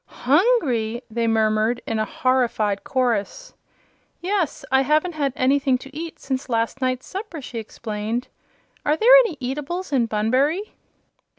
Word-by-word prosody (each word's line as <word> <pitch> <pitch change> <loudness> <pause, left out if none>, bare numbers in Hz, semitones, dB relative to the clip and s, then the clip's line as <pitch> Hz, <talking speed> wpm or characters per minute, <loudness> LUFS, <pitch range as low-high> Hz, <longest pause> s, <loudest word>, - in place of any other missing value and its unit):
"Hungry!" 260 - +1
they 230 +1 0
murmured, 220 +1 +2
in 225 -1 -2
a 215 - +1
horrified 230 -6 0
chorus. 255 - -1 0.7
"Yes; 355 -6 -1
I 265 0 +5
haven't 305 +6 +2
had 285 -3 -1
anything 270 0 +2
to 270 +2 -13
eat 330 +1 -6
since 265 0 -4
last 230 +3 -1
night's 255 0 -1
supper," 385 -4 -6
she 250 -4 -6
exclaimed. 220 +2 -4 0.6
"Are 300 +1 +1
there 475 +6 +6
any 355 -10 -4
eatables 295 +7 -4
in 245 -4 +2
Bunbury?" 260 - 0
260 Hz, 135 wpm, -22 LUFS, 230-305 Hz, 0.7 s, there